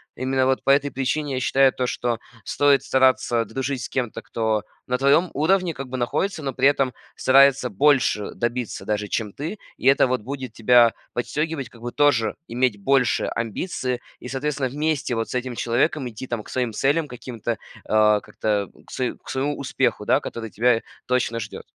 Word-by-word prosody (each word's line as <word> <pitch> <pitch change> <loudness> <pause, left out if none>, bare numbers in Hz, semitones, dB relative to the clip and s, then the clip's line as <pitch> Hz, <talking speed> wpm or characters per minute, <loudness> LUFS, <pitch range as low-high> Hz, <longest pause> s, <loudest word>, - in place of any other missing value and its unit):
Именно 130 +1 0
вот 130 0 +1
по - - -1
этой 140 +1 +4
причине 140 +2 -2
я 130 - -1
считаю, 135 0 +4
то 130 - -1
что 120 -1 -1 0.3
стоит 145 -1 +3
стараться 130 -3 +2
дружить 130 +2 -3
с - - -5
кем-то, 120 -4 -3
кто 110 -2 -1 0.2
на 125 - 0
твоем 140 +7 +3
уровне, 175 +4 +2
как 135 -3 -7
бы, 130 - -4
находится, 160 +9 -1
но 135 -1 -2
при 130 +2 0
этом 135 -3 0 0.2
старается 135 -1 +5
больше 125 -2 +2
добиться 120 0 -3
даже 105 -1 -2
чем 105 -4 -2
ты, 160 +9 -5 0.2
и - - -10
это, 135 0 +5
вот, 125 -1 -1
будет 130 +2 -6
тебя 120 0 +5 0.2
подстегивать, 150 +3 -2
как 115 - -17
бы, 120 0 -4
тоже 120 -7 +2
иметь 120 -3 0
большие 135 +1 +2
амбиции 125 - -3 0.2
и 125 - -8
соответственно 135 0 -2
вместе 150 -1 -1
вот 115 0 -1
с - - -5
этим 125 -1 -2
человеком 125 +5 0
идти, 115 +3 -8
там, 120 -3 -3
к - - -14
своим 125 -3 -1
целям 145 +8 +1
каким-то, 120 -2 -5
э, 115 - -2 0.3
как-то, 105 -1 +1
э, - - -21
к - - -16
свое 130 -1 -2
к - - -15
своему 140 +2 -1
успеху, 125 -5 -1
да, - - +4
который 115 -1 -6
тебя 115 +1 +2 0.2
точно 125 -2 0
ждет. 110 - -7
130 Hz, 185 wpm, -23 LUFS, 115-140 Hz, 0.3 s, старается